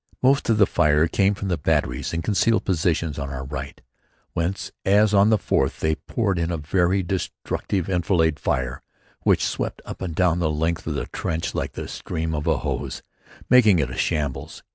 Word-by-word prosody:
Most 135 0 +3
of 110 - +4
the 105 - +6
fire 75 -2 +3
came 100 +4 +2
from 95 0 -4
the 85 -3 0
batteries 60 -3 0
in 85 0 -2
concealed 110 +2 +2
positions 80 -4 0
on 70 - -4
our 70 -1 -5
right, 70 +3 -6 0.5
whence, 85 +4 -2
as 105 +2 +4
on 100 +1 +5
the 110 - +4
fourth, 65 -8 0
they 80 0 +1
poured 100 +3 -1
in 85 0 0
a 85 - -1
very 90 +4 +1
destructive 95 +1 -3
enfilade 85 -4 +1
fire 65 0 -1 0.4
which - - +3
swept - - -3
up - - -8
and 90 -4 -4
down 90 -1 +2
the 80 -3 +1
length 80 +3 -1
of 75 - -2
the 70 - -2
trench 80 0 -3
like - - -3
the - - -6
stream 80 0 -4
of 75 -1 -3
a - - +3
hose, - - -4 0.4
making 110 -7 +6
it 65 -5 0
a - - -6
shambles. 70 -4 -2
85 Hz, 190 wpm, -23 LUFS, 75-95 Hz, 0.5 s, the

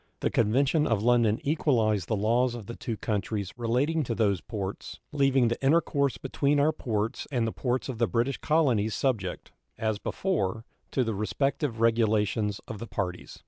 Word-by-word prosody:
The - - 0
convention 135 +7 +2
of 110 -3 +1
London 120 -2 +3
equalized 115 - +1
the 110 - 0
laws 120 +4 +2
of 115 -4 -8
the 115 - -7
two 115 -3 -4
countries 100 -2 -2
relating 125 +7 +1
to 115 - -2
those 100 -5 +1
ports, 100 -3 -6
leaving 135 -3 +3
the 120 +3 -2
intercourse 140 -4 +2
between 140 +4 0
our 150 +2 +4
ports 115 -7 -3
and 120 -4 +1
the 115 - -1
ports 125 +2 -2
of 125 -4 -5
the 115 - +3
British 120 +3 0
colonies 125 -10 +2
subject, 105 -9 -2 0.3
as 110 -2 -1
before, 115 - -2 0.2
to 130 - +1
the 115 -2 -2
respective 120 +4 -1
regulations 110 -2 +2
of 110 - -6
the 115 - -6
parties. 90 -4 -4
115 Hz, 170 wpm, -28 LUFS, 105-135 Hz, 0.3 s, our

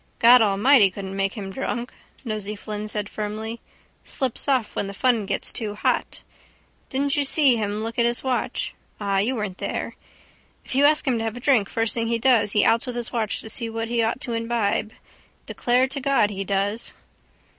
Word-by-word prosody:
—God 245 +1 +7
Almighty 210 +2 +5
couldn't 195 0 -7
make 195 0 0
him 195 -3 -6
drunk, 245 +1 -4 0.3
Nosey 215 -2 -4
Flynn 210 0 -6
said 210 -1 -3
firmly. 215 +2 -5 0.4
Slips 265 -1 -2
off 260 -6 +1
when 200 - -1
the 200 - -7
fun 235 -3 +1
gets - - -2
too 215 -3 -4
hot. - - -1 0.7
Didn't 275 +1 0
you 290 - +2
see 275 -2 +4
him 210 -1 -2
look 230 +1 -4
at 235 - +4
his 235 0 0
watch? 260 -2 -2 0.3
Ah, 200 -2 0
you 235 +7 0
weren't 210 -5 -4
there. - - -4 0.7
If - - -6
you 275 +2 +4
ask 300 +1 +4
him 245 -3 +2
to - - -2
have 225 +1 -3
a - - -6
drink 240 -6 +2
first 225 -1 -1
thing 230 -1 -1
he 235 0 +1
does 230 -4 +3
he 210 - +4
outs 230 +3 +3
with 250 - -4
the 240 -1 -3
watch 220 -3 -1
to 220 - -9
see 230 0 -2
what 225 0 -4
he 235 -1 +1
ought 225 +3 0
to 240 - -4
imbibe. 230 -2 -1 0.5
Declare 250 +2 +1
to 275 - -1
God 265 -6 +2
he 195 -1 -4
does. 200 +3 0
225 Hz, 200 wpm, -23 LUFS, 210-245 Hz, 0.7 s, God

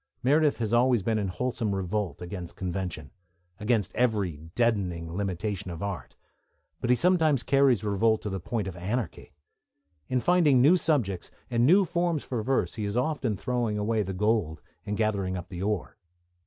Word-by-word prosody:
Meredith 150 +3 +3
has 115 -1 -2
always 120 -3 +3
been 110 +1 +1
in 100 - -1
wholesome 110 +2 -2
revolt 95 0 -2
against 90 -1 -7
convention, 90 -5 -4 0.5
against 105 -4 0
every 105 -9 +1 0.2
deadening 90 -8 0
limitation 100 0 -3
of 85 +1 -6
art, 100 -2 -5 0.6
but 120 - -3
he 125 - +6
sometimes 160 -4 +3
carries 135 -6 +3
revolt 110 +2 +1
to 105 - -2
the 95 - -3
point 105 +3 -3
of 95 - -6
anarchy. 100 +4 -4 0.8
In 130 - +1
finding 155 -3 +4
new 145 +8 +6
subjects 130 - 0 0.2
and 120 +1 +3
new 190 +5 +6
forms 170 -3 0
for 120 -4 -3
verse 130 +5 0
he 105 - -3
is 100 +3 -2
often 125 -5 0
throwing 120 -1 -1
away 110 +1 0
the 95 -2 -3
gold 100 -4 0 0.3
and 105 0 -2
gathering 100 -4 0
up 90 - -8
the 90 -1 -6
ore. 105 +1 -2
110 Hz, 170 wpm, -27 LUFS, 95-125 Hz, 0.8 s, he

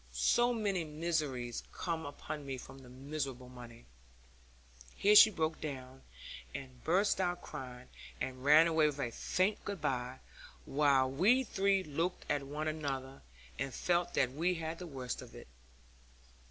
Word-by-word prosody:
So 240 - +3
many 205 -6 0
miseries 150 -6 -2
come 165 -3 -3
upon 145 +1 -6
me 135 -1 -4
from 135 +2 -11
the 130 -2 -14
miserable 135 -1 -5
money 120 -2 -12 0.6
' - - -29 0.3
Here 205 +1 +4
she 220 - +11
broke 160 -5 -2
down, 135 -3 -6 0.5
and 130 -3 -8
burst 190 +3 +2
out 175 -1 -1
crying, 125 -4 -8 0.3
and 130 0 -4
ran 150 +3 +7
away 160 -2 +4
with 145 -2 -3
a 125 -4 -2
faint 185 - 0
good 200 -2 -4
bye; 130 -3 -2 0.5
while 140 -2 +3
we 210 - +4
three 195 -4 +1
looked 165 +4 -2
at 145 -1 +1
one 150 +2 -3
another, 135 -4 -4 0.4
and 135 - -2
felt 175 0 0
that 130 -2 +2
we 170 +6 0
had 165 0 -4
the 180 - -6
worst 130 -5 -5
of - - -12
it. - - -11
150 Hz, 155 wpm, -34 LUFS, 130-170 Hz, 0.6 s, she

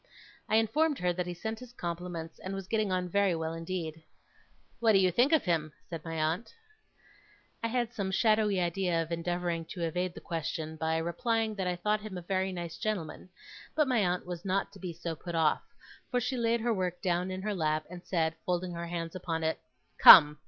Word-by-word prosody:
I 215 - +3
informed 275 +8 +3
her 180 0 +1
that 180 0 -3
he 175 - -3
sent 220 +5 -4
his 250 -1 -11
compliments, 170 -4 -5
and 190 +1 -5
was 195 -1 -6
getting 215 -2 0
on 180 -1 0
very 195 0 +2
well 160 0 -3
indeed. 165 -1 -4 0.8
'What 225 -2 +4
do - - +7
you 185 -1 +4
think 245 - +3
of 320 - +4
him?' 160 -4 0 0.2
said 165 - -5
my 165 -1 -5
aunt. 160 - -1 1.1
I 230 - 0
had 240 0 -1
some 200 -3 -2
shadowy 215 -1 +3
idea 175 0 0
of 165 - -11
endeavouring 170 0 -1
to 175 +1 -6
evade 180 +2 -1
the - - -7
question, 160 -1 -4
by 160 0 0
replying 220 +7 0
that 190 -3 -2
I 180 - 0
thought 210 +4 0
him 210 -3 -6
a 175 - -7
very 190 +1 0
nice 170 -2 -6
gentleman; 185 -5 -3 0.5
but 305 -1 +3
my 250 -3 +2
aunt 180 -3 0
was 175 -1 -6
not 195 0 0
to 195 - -13
be 185 -2 -4
so 170 0 -5
put 170 +2 -6
off, 160 -2 +3 0.5
for 250 - +1
she 245 +2 -2
laid 235 -1 +1
her 235 0 +1
work 180 -3 -2
down 180 0 +1
in 185 0 -4
her 210 0 -1
lap, 155 -4 0
and 175 +1 -10
said, 165 -3 0
folding 180 0 -1
her 170 0 -5
hands 170 -1 -4
upon 165 -3 -3
it: 160 0 0 0.4
'Come! 150 -3 +10
180 Hz, 210 wpm, -30 LUFS, 165-210 Hz, 1.1 s, Come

